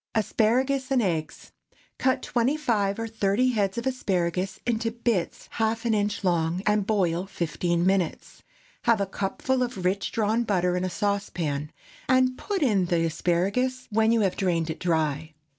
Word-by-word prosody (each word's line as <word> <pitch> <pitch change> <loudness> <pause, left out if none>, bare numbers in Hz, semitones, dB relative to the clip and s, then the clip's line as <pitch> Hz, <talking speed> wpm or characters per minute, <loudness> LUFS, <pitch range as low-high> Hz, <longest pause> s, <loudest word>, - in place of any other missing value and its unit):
ASPARAGUS 255 +5 +1
AND 260 -3 +2
EGGS. 160 -5 -3 0.5
Cut 260 0 +1
twenty 250 +5 +1
five 205 -9 0
or 225 0 -3
thirty 220 +3 +1
heads 205 -4 0
of 235 - -3
asparagus 185 -7 -1
into 230 -1 0
bits 225 -5 -2
half 225 +1 -1
an 230 - +2
inch 205 0 0
long, 170 0 +1
and 210 -1 +2
boil 185 -4 +1
fifteen 175 -2 -1
minutes. 190 -3 -1 0.4
Have 230 -3 +4
a 200 - +1
cupful 205 +7 -2
of 240 -7 -3
rich 195 +2 0
drawn 220 +1 +1
butter 180 -5 +1
in 180 - -1
a 185 - -1
saucepan, 175 -8 -2 0.4
and 255 -1 +4
put 390 +4 -2
in 205 -8 +3
the 170 -1 +1
asparagus 195 +10 0
when 220 +1 +3
you 230 -1 +3
have 190 -3 +1
drained 170 -4 0
it - - -7
dry. 160 -2 -1
200 Hz, 160 wpm, -26 LUFS, 180-235 Hz, 0.5 s, Have